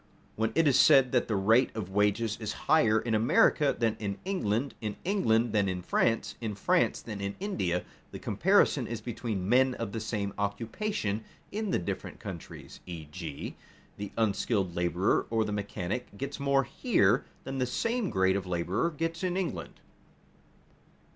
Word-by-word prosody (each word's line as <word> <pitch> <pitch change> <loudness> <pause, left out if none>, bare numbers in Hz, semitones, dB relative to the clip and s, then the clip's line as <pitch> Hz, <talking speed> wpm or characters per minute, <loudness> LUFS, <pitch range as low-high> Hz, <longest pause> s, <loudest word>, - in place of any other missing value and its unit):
When 110 +1 0
it 165 -1 +4
is 135 - +4
said 130 -2 +6
that 125 - +2
the 110 - 0
rate 110 +6 +4
of 100 -4 -4
wages 105 +2 +1
is 105 -1 -3
higher 115 -8 +4
in 115 -1 -2
America 120 +6 +4
than 115 -2 +1
in 100 -2 -3
England, 135 - -1
in 105 -2 -3
England 120 - +2
than 100 -2 +2
in 90 -1 -3
France, 115 +5 +1
in 110 -3 -3
France 100 - +1
than 105 -3 -6
in 100 0 -3
India, 135 - -1 0.3
the - - -7
comparison - - +2
is 115 -2 -4
between 110 -4 -4
men 130 +3 +4
of 115 -3 -4
the 115 - -3
same 105 -2 -3
occupation 110 - -2 0.3
in 215 0 -2
the - - +2
different 85 - -5
countries; - - -9
e.g., 80 -2 -7 0.4
the 100 -1 -5
unskilled 100 -4 0
laborer 90 +2 +1
or 115 -1 +1
the 105 - -3
mechanic 100 +1 -4
gets 140 +4 -5
more 140 -1 +3
here 120 - +2 0.2
than 135 0 -4
the 125 - +1
same 230 - -1
grade 95 -1 +2
of 95 -2 -3
laborer 90 - 0
gets 165 +2 -3
in 180 0 0
England. 95 - -4
110 Hz, 165 wpm, -29 LUFS, 100-130 Hz, 0.4 s, said